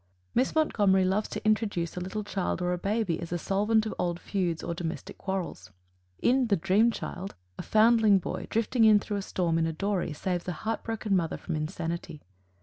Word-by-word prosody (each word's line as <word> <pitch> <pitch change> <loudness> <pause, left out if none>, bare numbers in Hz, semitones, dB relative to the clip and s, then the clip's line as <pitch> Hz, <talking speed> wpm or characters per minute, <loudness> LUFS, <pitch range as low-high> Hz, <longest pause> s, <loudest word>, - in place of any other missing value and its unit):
Miss 255 +5 +1
Montgomery 205 -11 +3
loves 195 +3 0
to - - -6
introduce 210 -6 +1
a - - -3
little 190 +4 -4
child 195 -2 -2
or 180 0 0
a - - -1
baby 200 -3 0
as 170 -1 -6
a 175 - 0
solvent 210 +5 +1
of 215 - -3
old 175 -1 -1
feuds 180 -5 -2
or 170 - -2
domestic 165 -1 -5
quarrels. 185 - -4 0.5
In 255 0 +3
"The 205 - +3
Dream 195 +6 +3
Child," 195 -4 -5 0.2
a - - -1
foundling 220 -2 +5
boy, 185 - -4
drifting 225 +2 +1
in 215 -1 +7
through 205 0 -3
a - - -2
storm 170 -4 0
in 165 - +2
a 160 - -2
dory, 195 0 -1
saves 175 +3 -3
a 180 - -1
heart 225 0 -1
broken 220 -3 -1
mother 165 -3 0
from 170 - -4
insanity. 165 0 -4
195 Hz, 200 wpm, -28 LUFS, 175-215 Hz, 0.5 s, in